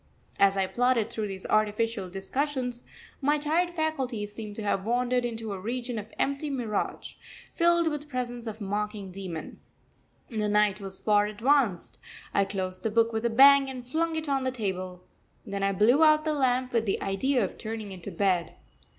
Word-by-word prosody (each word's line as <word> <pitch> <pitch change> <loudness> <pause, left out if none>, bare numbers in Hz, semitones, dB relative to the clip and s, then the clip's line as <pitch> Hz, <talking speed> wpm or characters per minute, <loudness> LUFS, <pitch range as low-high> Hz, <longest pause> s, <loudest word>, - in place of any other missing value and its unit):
As 195 0 +4
I 190 - +2
plodded 240 +1 +1
through 220 -3 -2
these 190 -1 -6
artificial 215 -1 0
discussions, 250 +5 -2 0.4
my 295 +2 +3
tired 320 +4 +1
faculties 265 -11 -2
seemed 210 -2 -7
to 220 - -5
have 200 -2 0
wandered 245 +2 +1
into 225 -2 -3
a 195 - -5
region 240 +3 -3
of 210 - -9
empty 280 +2 -1
mirage, 235 -7 -3 0.4
filled 340 -1 +3
with 300 -2 -1
the 295 - -14
presence 245 -3 -4
of 220 0 -5
a - - -6
mocking 205 -1 -3
demon. 180 -4 -7 0.7
The 215 -3 -1
night 210 -1 +2
was 190 -1 -6
far 210 -1 +3
advanced. 225 -3 +1 0.3
I 200 - +3
closed 185 -2 -4
the 225 - 0
book 230 +1 +2
with 220 +1 -1
a - - +3
bang 275 +3 +7
and 255 -2 -6
flung 325 +4 0
it 315 -1 -3
on 275 -2 +1
the 260 - +1
table. 185 -6 -4 0.4
Then 200 0 -4
I 195 0 +2
blew 230 - +4
out 305 0 +5
the 310 - +1
lamp 255 -3 +1
with 230 -2 +1
the 195 - +1
idea 240 +5 +1
of - - -8
turning 220 -2 -5
into 180 -3 -7
bed. 185 -4 0
225 Hz, 185 wpm, -28 LUFS, 200-265 Hz, 0.7 s, bang